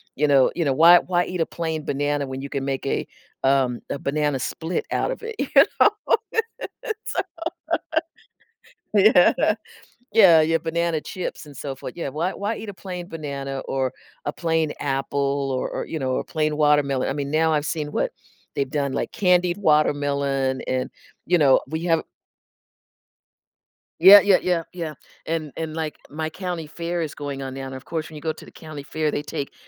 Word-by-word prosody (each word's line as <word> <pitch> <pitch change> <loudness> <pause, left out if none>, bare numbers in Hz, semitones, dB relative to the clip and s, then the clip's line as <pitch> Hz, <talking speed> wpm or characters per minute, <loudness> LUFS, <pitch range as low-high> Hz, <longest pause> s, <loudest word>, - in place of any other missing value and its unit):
you 150 +2 +2
know 140 -2 +5
you 170 - 0
know, 135 - +2
why 170 +5 +8
why 175 -1 0
eat 180 -2 -3
a - - +3
plain 160 -2 -3
banana 145 0 0
when 130 0 -5
you 140 - -6
can 140 -2 -3
make 135 -1 -2
a, 135 - -1 0.4
um, 135 -3 +2
a 140 - -3
banana 145 -1 0
split 160 +6 -3
out - - 0
of - - -5
it? 450 0 -5
You - - 0 0.3
know, - - +8 1.0
it's 440 -2 -4
so - - +2 1.7
Yeah. 200 -3 +6 0.8
Yeah 185 -8 +8
yeah, 165 +1 +2
banana 170 0 0
chips, 185 -4 -5
and 145 -1 -13
so 135 -2 -5
forth, 135 - -8
yeah, 165 - -3
why 165 +7 -2
why 205 +3 -2
eat 220 - -8
a - - -6
plain 180 -2 -7
banana 140 -4 -5
or 130 -1 -1 0.3
a 145 - -2
plain 160 -2 0
apple 140 0 -1
or 130 - -1
or, - - -4
you 160 - -4
know, 130 -2 -1
or - - -1
plain 155 -1 -1
watermelon? 145 -3 +3
I - - -1
mean, 140 -1 -3
now 160 +1 +3
I've 150 -1 0
seen 150 -2 -3
what - - 0 0.4
they've 140 -1 -1
done, 140 -2 -1
like, - - -2
candied 180 -3 +2
watermelon 140 -5 +1
and, 130 0 -1 0.4
you 175 - +4
know, 140 -5 +5
we 160 +3 -4
have 165 -2 +3 2.0
Yeah, 195 +5 +11
yeah, 200 -1 +5
yeah, 175 -2 +1
yeah, 165 -4 -4 0.3
and 160 -2 -2
and 160 -1 -4
like 160 -2 -3
my 155 +1 -3
county 175 -2 -5
fair 170 +2 -3
is 155 -3 -3
going 140 -2 -5
on 135 -1 -5
now, 135 0 -6
and 130 - -7
of 130 - -10
course, 160 -1 -4
when 155 - -12
you 150 - -8
go 160 0 -1
to - - -13
the - - -14
county 155 -3 -9
fair 155 +1 -1
they - - -2
take 145 -1 -5
155 Hz, 190 wpm, -23 LUFS, 140-170 Hz, 2.0 s, Yeah